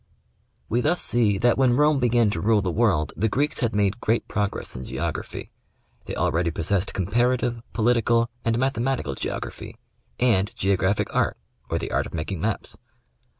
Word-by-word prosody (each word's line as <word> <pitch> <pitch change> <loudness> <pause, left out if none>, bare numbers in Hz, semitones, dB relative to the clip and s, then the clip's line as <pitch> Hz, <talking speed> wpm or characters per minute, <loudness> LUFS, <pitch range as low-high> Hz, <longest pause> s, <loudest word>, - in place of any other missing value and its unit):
We 120 +2 +1
thus 165 +7 +1
see 110 -4 +3
that 120 +5 +2
when 125 -2 +4
Rome 150 -1 +4
began 120 -3 +3
to - - -3
rule 105 -1 +3
the 90 - -1
world, 95 -9 +1
the 110 +7 0
Greeks 145 +7 0
had 115 -6 0
made 100 +1 +1
great 115 +2 0
progress 105 -2 -2
in 65 - -6
geography. 75 +5 -5 0.6
They - - -4
already 85 +1 +1
possessed 90 +5 -1
Comparative, 120 +4 0
Political 115 0 +2 0.2
and 115 0 +1
Mathematical 130 - -1
Geography, - - -6 0.4
and 105 -5 +3
Geographic 100 -1 0
Art, - - +1 0.3
or - - 0
the - - -4
art - - 0
of - - -8
making 80 +2 -4
maps. 110 +1 -3
110 Hz, 160 wpm, -24 LUFS, 95-120 Hz, 0.6 s, when